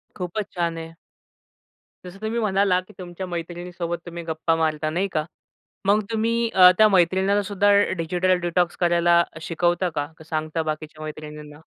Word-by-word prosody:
खूपचं 185 +3 -3
छान 170 -1 -1
आहे. 165 0 -8 1.1
जसं 185 +2 -10
तुम्ही 220 +2 -2
म्हणाला, 195 -3 +2
की 185 - -18
तुमच्या 180 +1 -6
मैत्रिणीसोबत 175 0 -5
तुम्ही 170 0 -7
गप्पा 165 0 0
मारता, 155 -1 0
नाही 180 +5 0
का? 155 -1 -1 0.6
मग 210 +2 +4
तुम्ही 225 +1 0 0.2
अ, 180 -1 +9
त्या 215 - +7
मैत्रिणींना 190 +2 +3
सुद्धा 205 +1 +2 0.3
डिजिटल 180 +3 +1
डिटॉक्स 175 0 0
करायला 170 0 +4 0.2
शिकवता 175 +2 0
का? 145 -3 -2
का 160 - -13
सांगता 155 0 -2
बाकीच्या 155 0 -7
मैत्रिणींना? 150 0 -9
175 Hz, 150 wpm, -23 LUFS, 160-190 Hz, 1.1 s, अ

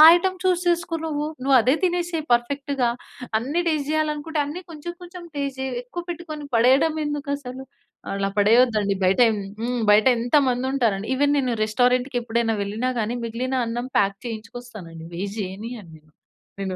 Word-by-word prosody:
Item 370 +1 0
చూస్ 360 -1 +2
చేసుకో 340 -1 0
నువ్వు. 300 -1 -2 0.2
నువ్వదే 260 -2 +5
తినేసేయి 345 -3 -1
పర్ఫెక్ట్‌గా. 270 +1 0 0.5
అన్ని 280 +9 -1
టెస్ట్ 295 -3 -1
జేయాలి 310 0 +1
అనుకుంటే 310 +1 -3
అన్ని 300 +5 -5
కొంచెం 320 +2 -6
కొంచెం 355 0 -10
టెస్ట్ 280 -2 -3
జెయి. 265 -1 -2
ఎక్కువ 300 +8 -6
పెట్టుకొని 320 -3 -6
పడేయడం 265 +7 +4
ఎందుకసలు. 285 -3 -4 0.5
అలా 195 0 -1
పడేయద్దు 230 +3 +5
అండి. 200 -1 0
బయటెం 220 +4 +4 0.2
హ్మ్, 240 +1 -1
బయటెంత 235 +4 +4
మందుంటారండి. 245 -5 0
ఈవెన్ 285 +2 +3
నేను 255 -3 +1
రెస్టారెంట్‌కి 250 +4 +2
ఎప్పుడైనా 230 -1 0
వెళ్ళినా 215 +6 -2
గాని 225 +2 -1
మిగిలిన 245 +3 -3
అన్నం 240 +2 -3
పాక్ 195 -1 +1
చేయించుకొస్తానుండి. 220 -7 -8
వేస్ట్ 200 +4 -4
జేయనియను 205 +1 -7
నేను. 155 0 -25 0.5
నేను. 190 -1 -2
250 Hz, 145 wpm, -23 LUFS, 225-295 Hz, 0.5 s, నువ్వదే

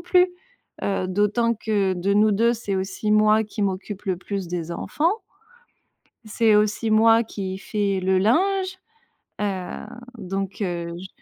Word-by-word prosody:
plus, 360 +1 +4 0.6
heu, 195 -2 -1
d'autant 210 +5 +1
que 205 -3 0
de 185 +3 0
nous 210 +1 +4
2, 230 +4 +3
c'est 205 -4 -4
aussi 190 +3 -1
moi 215 +1 +4
qui 210 0 -5
m'occupe 195 +1 -3
le 190 -2 0
plus 190 -1 -5
des 170 -1 -4
enfants». 325 - 0 1.1
«c'est 220 0 +2
aussi 215 +2 +1
moi 225 +1 +5
qui 190 -3 -5
fais 200 -2 -1
le 185 0 +2
linge». 375 - +1 0.6
Heu, 190 -2 -3 0.3
donc, 195 +1 -4
heu, 170 -2 -3
j 190 - -8
205 Hz, 145 wpm, -23 LUFS, 190-220 Hz, 1.1 s, moi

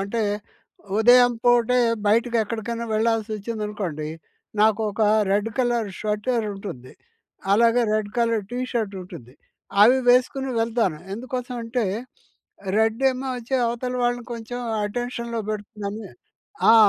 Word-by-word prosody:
అంటే 200 +4 -1 0.8
ఉదయం 245 +2 +6
పూటే 245 0 +4 0.3
బయటకెక్కడికైనా 230 +1 0
వెళ్లాల్సొచ్చిందనుకోండి 215 -6 -2 0.5
నాకు 220 0 +4
ఒక 215 +2 -2 0.3
రెడ్ 205 +2 +2
కలర్ 240 -4 +1
స్వెటర్ 215 +3 -1
ఉంటుంది. 175 -11 -8 0.6
అలాగే 235 +3 +4
రెడ్ 215 -1 -1
కలర్ 230 -2 +2
టీ 245 - -3
షర్ట్ 220 -5 -1
ఉంటుంది. 125 -8 -12 0.5
అవి 245 +5 +7
వేసుకొని 255 +2 +3
వెళ్తాను 225 -8 0 0.2
ఎందుకోసం 250 +2 -5
అంటే 230 0 -1 0.9
రెడ్ 225 +3 +1
ఏమో 260 +1 -5
వచ్చి 245 +2 -4
అవతల 240 +2 -2
వాళ్ళని 245 0 0
కొంచెం 235 +1 -6 0.3
అటెన్షన్‌లో 235 +1 -3
పెడుతుందని. 210 0 -5 0.6
ఆ! - - +8
230 Hz, 110 wpm, -24 LUFS, 210-245 Hz, 0.9 s, ఆ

